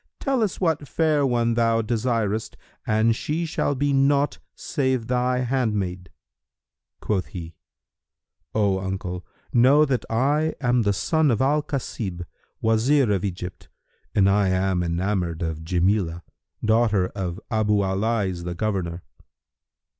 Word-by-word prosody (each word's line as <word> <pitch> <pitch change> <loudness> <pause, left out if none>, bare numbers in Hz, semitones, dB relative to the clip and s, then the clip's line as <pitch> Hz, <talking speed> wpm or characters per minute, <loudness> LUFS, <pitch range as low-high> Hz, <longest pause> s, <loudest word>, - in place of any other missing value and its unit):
Tell 270 -3 0
us 210 -5 -1
what 160 -5 0
fair 155 -3 +2
one 120 -2 +1
thou 115 -1 +2
desirest, 110 -2 -1 0.3
and 110 +1 +3
she 160 +7 -2
shall 155 -3 -1
be 140 +1 +1
naught 140 +1 +2 0.2
save 130 -6 -1
thy 125 +1 +1
handmaid." 105 -9 -1 0.9
Quoth 100 -4 -1
he, 85 -4 -8 1.0
"O 100 -3 +2
uncle, 95 -1 -4 0.3
know 135 +5 +6
that 130 -4 -1
I 145 +7 +1
am 125 -2 +2
the 100 -2 +2
son 160 - +1
of 115 -4 +1
al 145 +3 +2
Kasib, 110 - -4 0.4
Wazir 115 +3 +3
of 95 -3 0
Egypt, 90 -2 -5 0.5
and 95 -2 +5
I 100 0 +3
am 95 -1 +1
enamoured 85 -1 -1
of 80 -1 -3
Jamilah, 85 0 0 0.4
daughter 110 -4 +3
of 95 -2 -4
Abu 105 -2 +2
al 95 0 -1
Lays 100 -5 -1
the 90 0 -4
Governor." 90 -4 -2
110 Hz, 130 wpm, -24 LUFS, 95-130 Hz, 1.0 s, know